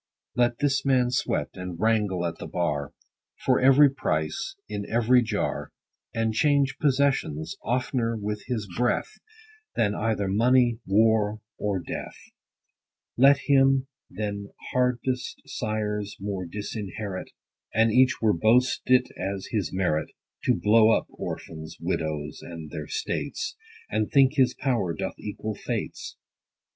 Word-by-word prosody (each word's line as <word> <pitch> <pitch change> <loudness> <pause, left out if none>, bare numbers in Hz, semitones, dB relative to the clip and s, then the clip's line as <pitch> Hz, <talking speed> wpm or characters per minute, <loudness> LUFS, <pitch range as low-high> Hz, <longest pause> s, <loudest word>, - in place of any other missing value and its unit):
Let 120 -1 +2
this 140 -1 +1
man 130 -3 +3
sweat, 125 - 0
and 90 -2 -7
wrangle 105 -4 +1
at 85 -1 -4
the - - -6
bar, 75 -5 -1 0.5
For - - +4
every 135 +3 +7
price, 130 - -2
in 100 - -4
every 120 +2 +4
jar, 115 - -2 0.4
And 115 -1 0
change 140 +2 +2
possessions, 130 - +1
oftner 120 -1 0
with 105 0 -3
his 115 -5 -2
breath, 125 - 0 0.6
Than 105 -2 +2
either 105 -2 -1
money, 120 +3 +3
war, 110 +1 +3 0.2
or 100 -2 0
death: 85 - -6 1.0
Let 135 +2 +6
him, 135 -1 +4 0.2
than 100 0 -4 0.2
hardest 125 0 -1
sires, 105 -5 -3
more 95 -2 -4
disinherit, 100 0 -5 0.4
And 115 +1 +3
each 130 +3 +4
where 110 -2 +4
boast 115 +8 +3
it 125 0 +5
as 95 -1 -4
his 105 -8 -1
merit, 90 -5 0 0.4
To - - +4
blow 110 +1 +5
up 110 - +3
orphans, 80 -1 -7
widows, 75 -2 -3
and 80 -3 -9
their - - -5
states; 440 0 -3 0.4
70 - - +1
And - - -7
think 135 -1 +5
his 130 -4 +3
power 120 - 0
doth - - -4
equal 105 +1 -4
fate's. - - -5
110 Hz, 130 wpm, -26 LUFS, 100-130 Hz, 1.0 s, every